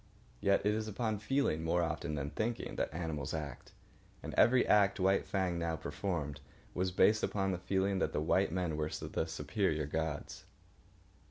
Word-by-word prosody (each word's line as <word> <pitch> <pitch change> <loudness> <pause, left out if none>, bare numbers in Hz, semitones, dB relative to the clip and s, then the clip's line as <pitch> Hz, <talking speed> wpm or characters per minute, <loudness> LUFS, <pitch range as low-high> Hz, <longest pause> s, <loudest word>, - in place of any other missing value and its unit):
Yet 100 +4 +2
it 105 - +3
is 110 0 -2
upon 110 0 -2
feeling, 110 - 0
more 85 +1 +2
often 80 -1 -2
than 70 0 -3
thinking, 115 +2 -2
that - - -1
animals 80 -3 -3
act; 75 -2 -6 0.5
and - - -5
every 125 +2 +5
act 100 -2 +4
White 95 +1 +2
Fang 90 -3 0
now 85 -1 -1
performed 75 -4 -3 0.3
was 90 +1 0
based 110 +4 +4
upon 95 -1 0
the 90 - -2
feeling 95 +2 0
that 80 - 0
the - - -1
white 90 +4 +2
men 85 -3 -1
were 75 0 -1
the 80 - -3
superior 80 0 -1
gods. 75 0 -3
90 Hz, 170 wpm, -34 LUFS, 80-100 Hz, 0.5 s, every